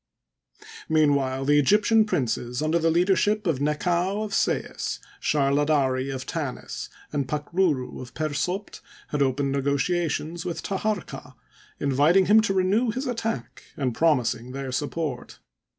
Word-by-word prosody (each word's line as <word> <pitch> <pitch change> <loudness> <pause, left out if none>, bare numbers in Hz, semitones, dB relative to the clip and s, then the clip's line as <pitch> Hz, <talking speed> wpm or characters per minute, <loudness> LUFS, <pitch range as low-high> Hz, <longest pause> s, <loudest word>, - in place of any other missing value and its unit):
Mean 155 -2 +4
while 135 -1 -1
the 145 +1 +4
Egyptian 210 +8 +4
princes, 125 - -1
under 160 +2 +2
the 165 0 +2
leadership 195 +5 +2
of 160 -7 +1
Nekau 175 +7 0
of 210 -2 -5
Sais, - - -1 0.2
Sharladari 140 -2 +1
of 130 0 -5
Tanis, 145 -6 -5 0.2
and 140 -3 -1
Pakruru 150 -1 -1
of 125 -1 -11
Per 155 0 -1
Sopd 180 +7 -3 0.3
had 150 - -1
opened 135 +1 +1
negotiations 155 +4 -1
with 175 - -4
Taharqa, 205 -1 -3 0.4
inviting 145 +7 +4
him 215 +3 +6
to 215 -3 0
renew 200 +6 +2
his 255 +5 -3
attack, 225 - -3 0.2
and 130 -4 -1
promising 125 -5 +1
their 135 -1 -4
support. 145 -1 -3
155 Hz, 135 wpm, -25 LUFS, 135-185 Hz, 0.4 s, him